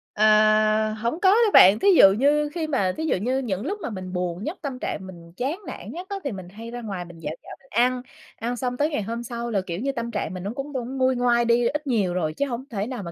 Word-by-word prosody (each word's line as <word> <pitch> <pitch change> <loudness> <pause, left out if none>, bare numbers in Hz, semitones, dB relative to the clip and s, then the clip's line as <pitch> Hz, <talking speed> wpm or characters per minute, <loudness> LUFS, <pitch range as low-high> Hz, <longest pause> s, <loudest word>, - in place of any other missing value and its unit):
Ờ, 215 0 +4
hổng 235 +9 -3
có 380 - +5
đâu 435 +1 +4
bạn. 195 +4 +8
Thí - - +1
dụ 195 - +9
như 295 +5 +2
khi 325 -3 -2
mà 195 -11 0
thí 320 - -2
dụ - - +1
như 250 +8 -1
những 215 -3 -3
lúc 410 +4 -3
mà 310 - -3
mình 185 -3 -7
buồn 180 +1 -3
nhất, 325 - -4
tâm 270 -5 -5
trạng 190 - -4
mình 170 -2 -12
chán 285 +9 -2
nản - - -7
nhất 360 +2 -8
á 400 - -3
thì 280 - -2
mình 190 -3 -8
hay 225 +4 -9
ra 245 0 -6
ngoài 195 -5 -5
mình 170 -1 -13
dạo 155 -1 -4
dạo - - -10
mình 270 - -24
ăn, 250 +3 +2 0.3
ăn 240 +2 -3
xong 250 0 -2
tới 295 +3 +1
ngày 290 -9 -2
hôm 230 +3 -4
sau 235 0 -5
là, 200 - +1
kiểu 175 -1 -5
như, 275 +3 -1
tâm 235 -3 -4
trạng 185 - -3
mình 185 - -6
nó 200 - -3
cũng 280 +1 -6
cũng 260 +1 -4
nguôi 260 0 +2
ngoai 240 -1 +2
đi 235 0 +3
ít 295 0 -3
nhiều 205 -8 +1
rồi, 155 -4 -1
chứ 280 - -1
hổng 245 0 -4
thể 205 -2 -3
nào 250 -5 -5
mà 170 - -6
235 Hz, 285 wpm, -24 LUFS, 195-270 Hz, 0.3 s, dụ